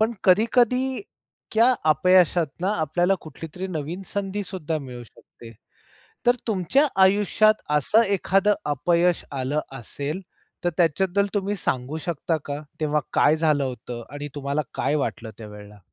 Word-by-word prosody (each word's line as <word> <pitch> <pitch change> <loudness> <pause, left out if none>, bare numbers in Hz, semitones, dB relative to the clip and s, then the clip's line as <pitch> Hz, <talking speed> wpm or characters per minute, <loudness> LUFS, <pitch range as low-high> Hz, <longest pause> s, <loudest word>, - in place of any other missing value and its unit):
पण 220 +2 +2
कधी-कधी 245 +6 +3 0.5
त्या 230 +3 +5 0.2
अपयशातून 175 +1 +3
आपल्याला 175 0 +1
कुठलीतरी 165 +4 -8
नवीन 165 +2 -4
संधीसुद्धा 190 -5 -3
मिळू 125 -4 -8
शकते, 115 0 -16 0.7
तर 245 0 +5
तुमच्या 220 - +2 0.2
आयुष्यात 210 +2 +3 0.2
असं 210 - +3
एखादं 195 +2 +2
अपयश 170 +4 +1
आलं 135 +2 -1 0.2
असेल, 145 - -5 0.4
तर 175 - +2
त्याच्याबद्दल 185 +4 +2
तुम्ही 205 0 -1
सांगू 130 +4 -1
शकता 165 -1 -1
का, 145 +1 -4 0.2
तेव्हा 150 0 +1
काय 150 +2 +4
झालं 155 -3 +2
होतं 125 -2 -6
आणि 145 0 -5
तुम्हाला 140 +1 -1
काय 150 - 0
वाटलं 115 -5 -3
त्यावेळेला? 105 -1 -11
165 Hz, 125 wpm, -24 LUFS, 145-195 Hz, 0.7 s, त्या